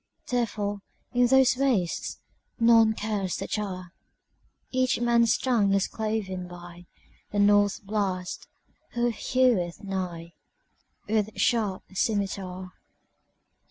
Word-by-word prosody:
Therefore, 205 -4 -2 0.3
in 245 0 +4
those 265 +1 +5
wastesNone 230 -1 +1
curse 205 -4 -2
the - - -5
Czar.Each 210 +6 -4
man's 235 -1 +3
tongue 215 -6 +2
is 195 - +1
cloven 205 -5 -3
byThe 175 0 -11 0.5
North 205 0 +4
Blast, 195 -3 -3 0.5
who 240 0 +1
heweth 225 -7 +1
nighWith 190 +3 -5
sharp 215 -6 +1
scymitar. 190 -3 -2
205 Hz, 85 wpm, -27 LUFS, 185-235 Hz, 0.5 s, those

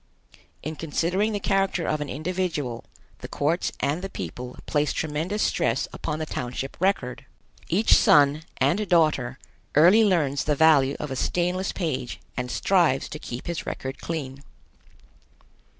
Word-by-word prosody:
In 155 +2 -4
considering 175 +7 0
the 205 - -2
character 195 -3 0
of 155 -1 -1
an 150 - -4
individual, 155 -6 -3 0.3
the - - -7
courts 160 +5 0
and 145 +6 0
the 195 - -5
people 125 - -7
place 150 -1 0
tremendous 160 +7 -2
stress 115 +3 +1
upon 150 - -3
the 155 - -3
township 130 -1 -4
record. 185 -10 0 0.4
Each 205 +6 +3
son 145 +1 +5 0.2
and 205 +3 +1
daughter 155 -8 +2 0.4
early 180 +9 +7
learns 155 -9 +1
the 150 - +2
value 145 -3 +5
of 150 - -5
a - - -2
stainless 180 +6 0
page 145 -9 -3 0.2
and 125 0 -3
strives 170 -4 +2
to 155 - -7
keep 120 -4 -7
his 170 -1 -4
record 135 0 -5
clean. 140 -5 -5
155 Hz, 145 wpm, -25 LUFS, 135-180 Hz, 0.4 s, early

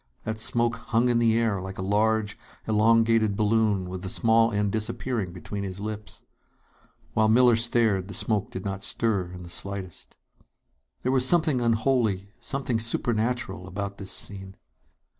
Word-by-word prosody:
That 110 0 -4
smoke 115 +1 +2
hung 120 +2 0
in 120 -1 +2
the 115 -1 +3
air 110 -5 0
like 95 +1 -7
a 95 - -4
large, 105 +1 +1 0.3
elongated 110 -1 +3
balloon 105 -3 +1
with 90 0 -6
the 95 - -5
small 115 +2 +3
end 105 -1 0
disappearing 110 -1 -2
between 95 +3 -6
his 95 -1 -6
lips. 105 0 -7 0.9
While 110 0 +3
Miller 120 +1 +5
stared, 115 -5 +1
the 100 - -6
smoke 105 -3 0
did 95 - -7
not 100 0 -4
stir 100 -8 -1
in 90 0 -9
the 85 - -10
slightest. 95 0 -6 0.9
There 130 - +1
was 130 -1 +4
something 155 -6 +3
unholy, 110 -4 0
something 130 -4 -2
supernatural, 115 -4 -1
about 100 +1 -5
this 95 -2 -7
scene! 95 -1 -6
110 Hz, 155 wpm, -26 LUFS, 100-115 Hz, 0.9 s, Miller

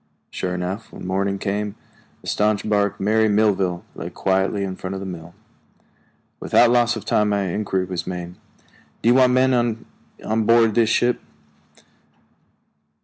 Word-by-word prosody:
Sure 90 -1 -3
enough, 95 +5 -5
when - - -9
morning 100 +1 -1
came, 100 +1 -3 0.5
the - - -11
staunch 105 0 0
bark 105 -1 +1
Mary 110 +2 +2
Melville 100 -3 +1
lay 85 - -6
quietly 95 +2 0
in 95 -1 -4
front 95 +1 -6
of - - -4
the 95 - -6
mill. 85 -2 -8 1.0
Without 120 -1 +4
loss 120 -1 +3
of 110 - -7
time 105 0 +2
my 100 -1 +1
inquiry 95 0 -1
was 90 -2 -5
made: 90 -1 -5 0.7
"Do 115 - +4
you - - +6
want 130 -1 +4
any 130 0 +4
men 120 -2 0 0.4
on 110 0 0
board 115 -1 +5
this 115 0 +3
ship?" 120 +1 +1
105 Hz, 155 wpm, -22 LUFS, 95-110 Hz, 1.0 s, you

